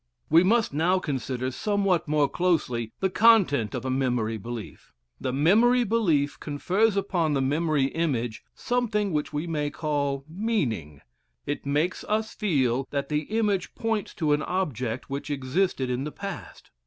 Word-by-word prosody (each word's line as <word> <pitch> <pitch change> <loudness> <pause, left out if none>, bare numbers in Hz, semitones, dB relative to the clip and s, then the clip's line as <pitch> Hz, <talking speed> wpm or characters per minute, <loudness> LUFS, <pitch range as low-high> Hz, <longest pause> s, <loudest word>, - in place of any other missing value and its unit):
We 165 +2 +7
must 220 -2 +2
now 170 +5 +2
consider 130 -5 -3
somewhat 195 - 0
more 150 -1 +3
closely 135 -11 0
the 190 - +2
content 185 - +4
of - - -4
a 130 - -1
memory 125 -4 0
belief. 115 +1 -8 0.3
The 130 - -2
memory 220 - +4
belief 175 -11 +1
confers 190 +8 +1
upon 175 -6 0
the - - +1
memory 150 +1 +1
image 130 -7 -2
something 215 -6 0
which 150 -1 -1
we 150 +3 -2
may 150 -3 -1
call 145 -2 -2
"meaning;" 150 - -2 0.4
it 145 - -4
makes 150 +6 0
us 220 +1 -1
feel 135 - 0
that 140 -1 -3
the 150 0 -1
image 210 -4 -1
points 225 -2 -2
to 155 -3 +1
an 150 - +1
object 130 - -2
which 140 +2 -4
existed 135 0 0
in 125 +2 -1
the 150 - -4
past. 195 +2 -8
150 Hz, 155 wpm, -26 LUFS, 135-195 Hz, 0.4 s, We